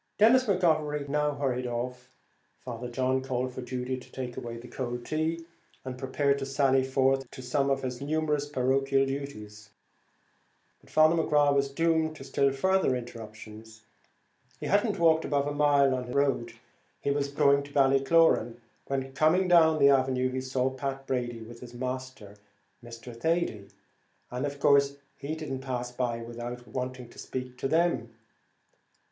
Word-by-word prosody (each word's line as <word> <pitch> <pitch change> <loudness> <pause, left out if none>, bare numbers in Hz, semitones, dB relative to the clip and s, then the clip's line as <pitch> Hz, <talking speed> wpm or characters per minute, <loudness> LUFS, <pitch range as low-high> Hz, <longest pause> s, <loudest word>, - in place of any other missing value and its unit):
Denis 245 +5 +5
McGovery 155 - +1
now 150 0 0
hurried 130 -3 -1
off. 125 +1 -4 0.5
Father 120 -1 -7
John 130 +1 0
called 130 -1 -2
for 130 - -6
Judy 125 +1 -4
to - - -16
take 125 -2 -5
away 115 0 -6
the 120 +1 -10
cold 120 -1 -5
tea, 160 +2 -2 0.4
and 130 -1 -5
prepared 140 +2 0
to 135 - -3
sally 135 -1 +2
forth 135 0 +1
to 130 - -10
some 135 +2 0
of 135 0 0
his 125 -1 -4
numerous 150 0 0
parochial 135 0 +1
duties. 105 -7 -6 1.1
But - - -23
Father 155 +1 +5
McGrath 150 -3 +3
was 140 0 +1
doomed 160 +1 +1
to 155 - -10
still 140 0 +1
further 190 0 +2
interruptions. 110 -2 -9 0.8
He - - -6
had - - +3
not - - -1
walked 160 -1 +4
above 140 -1 0
a 145 - -2
mile 145 -2 +4
on 125 -1 -2
his 125 - -7
road, 140 -4 +1 0.5
he 140 - -1
was 140 0 0
going 140 0 +3
by 140 - -10
Ballycloran, 135 -2 +3 0.3
when, 135 -1 -3
coming 160 +6 +3
down 160 -3 +5
the 140 -2 +6
avenue, 130 -1 +2
he 130 0 -2
saw 130 0 -1
Pat 135 +1 -4
Brady 120 -3 -2
with 115 +1 -11
his 120 0 -11
master, 130 -5 -6 0.5
Mr. 115 0 -10
Thady, 160 -7 -1 0.6
and 125 +3 -2
of 140 0 -7
course 140 0 +4 0.2
he 145 +3 -4
didn't 150 -4 -5
pass 125 -2 -4
without 120 0 -4
waiting 125 -1 -5
to - - -15
speak 125 -1 -6
to 135 - -1
them. 155 -8 +1
135 Hz, 160 wpm, -28 LUFS, 125-145 Hz, 1.1 s, the